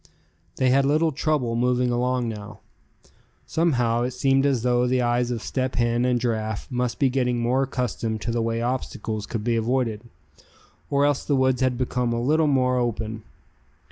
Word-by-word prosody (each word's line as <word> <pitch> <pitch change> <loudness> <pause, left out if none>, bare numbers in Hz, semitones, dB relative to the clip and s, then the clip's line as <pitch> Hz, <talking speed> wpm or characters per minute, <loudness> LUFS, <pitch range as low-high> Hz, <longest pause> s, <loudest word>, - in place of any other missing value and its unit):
They 130 -1 +2
had 135 +1 +4
little 155 +4 +2
trouble 135 -5 0
moving 125 +1 +1
along 125 0 0
now. 105 -1 -7 0.8
Somehow, 125 -8 +1
it 125 +1 -2
seemed 135 +1 +2
as 130 -5 0
though 125 0 +2
the 125 0 +1
eyes 120 0 +1
of 120 -3 -3
Step 130 -1 -2
Hen 120 0 +1
and 125 -1 +2
Giraffe 110 -3 -2
must 125 -1 -1
be 140 - +3
getting 125 -2 0
more 120 +3 +1
accustomed 125 -4 -2
to 120 - -2
the 115 0 0
way 115 0 -1
obstacles 110 -4 -3
could 115 -3 -4
be 120 +1 +1
avoided; 115 -2 0 0.9
or 140 0 +2
else 145 -1 +1
the 145 - +1
woods 130 -1 +2
had 130 -2 +1
become 125 -1 -1
a 115 - -1
little 155 +6 +2
more 130 -3 +2
open. 110 -2 -2
125 Hz, 175 wpm, -24 LUFS, 115-130 Hz, 0.9 s, had